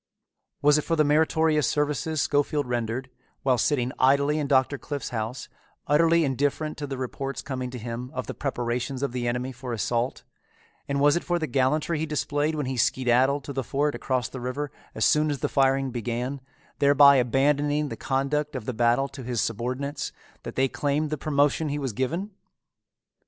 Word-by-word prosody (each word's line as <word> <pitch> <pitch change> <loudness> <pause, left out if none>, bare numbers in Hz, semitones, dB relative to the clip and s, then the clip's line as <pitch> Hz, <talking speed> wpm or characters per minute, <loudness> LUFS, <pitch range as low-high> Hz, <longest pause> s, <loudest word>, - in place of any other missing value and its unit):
Was 150 +1 +5
it - - -3
for 165 - 0
the 155 - +4
meritorious 155 0 +3
services 150 +1 0
Schofield 145 0 +1
rendered, 120 +1 -3 0.3
while 130 -3 +2
sitting 125 0 +1
idly 140 +3 +3
in 145 - -1
Doctor 135 0 +2
Cliffe's 145 -3 -5
house, 115 +2 -4 0.4
utterly 165 +3 +4
indifferent 145 +3 -1
to 145 - -4
the 135 -1 -4
reports 135 +2 -4
coming 130 -2 -4
to 125 - -7
him 120 +2 -5
of 130 - -3
the - - -5
preparations 125 0 -2
of 140 - 0
the 120 -1 -2
enemy 125 +2 -2
for 125 -1 -6
assault; 120 +3 -1 0.6
and 140 -1 -1
was 145 +2 +5
it 175 - -1
for 175 - 0
the 160 - -1
gallantry 145 +4 +1
he 160 - -2
displayed 150 +1 -1
when 150 -2 -2
he 130 0 -3
skedaddled 130 +4 +2
to 140 - -6
the 135 -1 -2
fort 145 +5 0
across 130 -3 -1
the 130 - -8
river 135 +4 -3 0.2
as - - +1
soon 150 0 +3
as 145 - -1
the - - +1
firing 135 -1 +2
began, 120 +3 -3 0.4
thereby 140 0 +7
abandoning 145 +4 +2
the - - -5
conduct 140 +2 -1
of 125 -5 -5
the 130 - -2
battle 120 +4 +2
to 135 0 -10
his 120 -2 -3
subordinates, 130 +6 -2 0.3
that - - -8
they 135 +1 +3
claimed 145 +3 -1
the - - +1
promotion 145 +1 +1
he 145 - -2
was 135 -5 -3
given? 165 - -2
135 Hz, 185 wpm, -26 LUFS, 125-150 Hz, 0.6 s, thereby